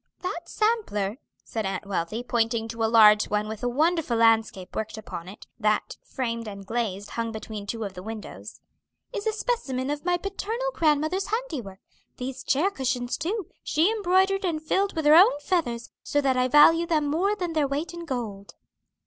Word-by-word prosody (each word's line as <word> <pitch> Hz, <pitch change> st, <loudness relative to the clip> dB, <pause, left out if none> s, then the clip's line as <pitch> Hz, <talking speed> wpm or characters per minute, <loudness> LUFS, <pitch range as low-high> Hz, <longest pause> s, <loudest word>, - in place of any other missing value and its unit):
"That 345 Hz, -1 st, -5 dB
sampler," 335 Hz, -, 0 dB, 0.3 s
said 225 Hz, -, -4 dB
Aunt 195 Hz, 0 st, -3 dB
Wealthy, 200 Hz, +4 st, -2 dB
pointing 230 Hz, -2 st, 0 dB
to 230 Hz, 0 st, -3 dB
a 220 Hz, -, +2 dB
large 215 Hz, -2 st, +7 dB
one 210 Hz, 0 st, -1 dB
with 220 Hz, -1 st, -6 dB
a 245 Hz, -, 0 dB
wonderful 310 Hz, -1 st, +1 dB
landscape 225 Hz, -5 st, +2 dB
worked 220 Hz, 0 st, -3 dB
upon 180 Hz, -5 st, -7 dB
it, 200 Hz, -, -12 dB
that, 215 Hz, -1 st, 0 dB
framed 230 Hz, -3 st, -3 dB
and 200 Hz, -1 st, -8 dB
glazed, 205 Hz, -3 st, -3 dB
hung 230 Hz, -1 st, -2 dB
between 215 Hz, -2 st, -7 dB
two 225 Hz, +1 st, -3 dB
of 200 Hz, -2 st, -5 dB
the 180 Hz, -, -8 dB
windows, 220 Hz, +2 st, -8 dB, 0.5 s
"is 435 Hz, -2 st, -3 dB
a -, -, +3 dB
specimen 290 Hz, -, -2 dB
of 290 Hz, 0 st, -4 dB
my 355 Hz, 0 st, +2 dB
paternal 435 Hz, +6 st, -3 dB
grandmother's 315 Hz, +4 st, +1 dB
handiwork; 290 Hz, -, -4 dB, 0.4 s
these 260 Hz, +1 st, -5 dB
chair 330 Hz, +9 st, +2 dB
cushions, 250 Hz, -6 st, -1 dB
too, 385 Hz, +3 st, -3 dB
she 325 Hz, +7 st, +2 dB
embroidered 390 Hz, -1 st, +2 dB
and 320 Hz, -4 st, -1 dB
filled 390 Hz, +5 st, 0 dB
with 320 Hz, -2 st, -2 dB
her 300 Hz, -, +7 dB
own 330 Hz, -3 st, +7 dB
feathers, 285 Hz, -8 st, -1 dB
so 290 Hz, -, 0 dB
that 270 Hz, -2 st, +2 dB
I 255 Hz, 0 st, +2 dB
value 325 Hz, +5 st, +6 dB
them 310 Hz, -3 st, +1 dB
more 355 Hz, +8 st, +1 dB
than 355 Hz, -5 st, -3 dB
their 305 Hz, -3 st, +2 dB
weight 290 Hz, +5 st, -3 dB
in 340 Hz, 0 st, -7 dB
gold." 220 Hz, -8 st, -5 dB
265 Hz, 185 wpm, -26 LUFS, 220-345 Hz, 0.5 s, large